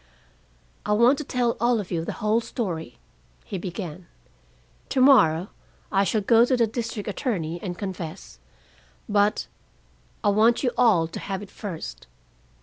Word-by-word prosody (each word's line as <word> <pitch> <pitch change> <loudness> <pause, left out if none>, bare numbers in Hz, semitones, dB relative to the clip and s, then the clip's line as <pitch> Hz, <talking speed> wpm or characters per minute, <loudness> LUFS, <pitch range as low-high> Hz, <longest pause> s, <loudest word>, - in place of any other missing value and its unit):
"I 210 - 0
want 240 +6 +4
to - - -3
tell 245 -4 0
all 235 0 +2
of 200 - -6
you 165 -2 -1
the - - -4
whole 220 +2 +3
story," 170 - -4 0.5
he 195 - -5
began. 175 -2 -6 0.8
"To 265 - 0
morrow 190 - +5 0.4
I 195 - +3
shall 215 +2 +1
go 230 +3 +5
to 255 +1 +2
the 235 - +4
district 225 -2 -4
attorney 175 - -2
and 175 -3 -5
confess, 185 -4 -7 0.7
but 205 -1 +2 0.8
I 205 - +4
want 220 +5 +3
you 250 - +2
all 205 -10 +4
to 165 - -7
have 195 0 -4
it 200 - -12
first. 160 - -7
205 Hz, 150 wpm, -25 LUFS, 175-235 Hz, 0.8 s, morrow